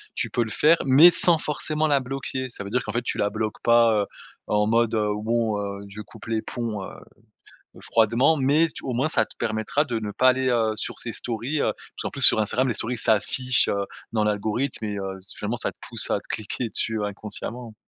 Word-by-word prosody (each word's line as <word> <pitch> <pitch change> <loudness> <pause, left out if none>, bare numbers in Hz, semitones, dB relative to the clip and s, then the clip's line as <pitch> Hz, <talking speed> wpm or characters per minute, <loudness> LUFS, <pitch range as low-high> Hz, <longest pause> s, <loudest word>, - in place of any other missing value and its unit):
tu - - -2
peux 120 - +1
le 110 - -7
faire 155 +10 +4
mais 145 +7 +8
sans 170 0 +5
forcément 155 0 -1
la 145 -2 +3
bloquer. 130 0 -4
Ça 100 - -7
veut 100 - -8
dire 125 - 0
qu'en 110 - -6
fait 120 +1 -1
tu - - -3
la 105 - +1
bloques 110 0 -4
pas, 115 -2 +4
heu, 100 - -1 0.4
en 105 0 +1
mode, 115 0 +2
heu, 105 -1 0
bon, 110 0 -1
heu, 100 0 -5
je 105 +2 -8
coupe 110 +1 -13
les 110 -1 -1
ponts, 115 -5 -4
heu, - - -6 0.9
heu, - - -13
froidement, 115 +8 +2
mais 145 +4 +3
tu - - -8
au 130 - -2
moins 130 +6 +1
ça 120 -8 +1
te - - -18
permettra 110 +6 -1
de 120 - -3
ne 105 -1 -5
pas 130 +5 +4
aller, 130 0 +1
heu, 115 -3 +1
sur 105 - -2
ses 120 - -3
stories, 125 +6 -3
heu. - - 0
Parce - - -11
qu'en - - -2
plus - - -6
sur - - +7
Instagram 130 +5 0
les 120 - 0
stories, 120 +3 -2
s'affichent, 120 +4 +3
heu, 100 0 -1 0.3
dans 110 -1 +1
l'algorithme 110 +4 -2
et 105 -1 -4
heu, 95 0 -5
s 95 +2 -9
finalement 110 +4 -3
ça - - -2
te - - -30
pousse - - +3
à - - +1
cliquer 110 +2 -3
dessus 110 0 -1
inconsciemment. 110 +3 -6
115 Hz, 230 wpm, -24 LUFS, 105-130 Hz, 0.9 s, mais